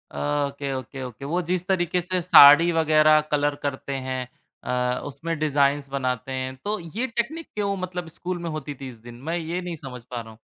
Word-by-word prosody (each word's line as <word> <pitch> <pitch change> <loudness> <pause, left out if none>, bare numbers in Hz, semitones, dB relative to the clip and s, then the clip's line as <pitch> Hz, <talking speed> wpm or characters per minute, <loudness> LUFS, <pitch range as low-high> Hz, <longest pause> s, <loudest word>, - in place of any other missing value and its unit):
Okay, 140 -1 -1
okay, 130 +1 -6
okay 125 +1 -8
वो 170 +5 0
जिस 180 -1 0
तरीक़े 180 -2 +1
से 180 +1 -1
साड़ी 165 0 +9
वग़ैरह 155 -1 +5
कलर 145 0 +2
करते 140 0 -3
हैं, 130 -1 -3 0.4
अ, 125 0 -1
उसमें 160 +4 -4
डिज़ाइन्स 145 -2 +2
बनाते 130 -2 -2
हैं। 130 0 -2
तो 210 +1 -1 0.2
ये 255 - 0
टेक्निक 260 +8 -3
क्यों 200 -1 0
मतलब 180 -1 -4
स्कूल 180 0 -3
में 170 - -3
होती 150 -2 -5
थी 135 - -5
इस 125 - -11
दिन? 120 +1 -11
मैं 160 +8 -3
ये 170 +2 -3
नहीं 175 -1 -5
समझ 130 -5 -9
पा 120 0 -6
रहा 115 -1 -11
हूँ। 110 - -17
145 Hz, 200 wpm, -24 LUFS, 130-175 Hz, 0.4 s, साड़ी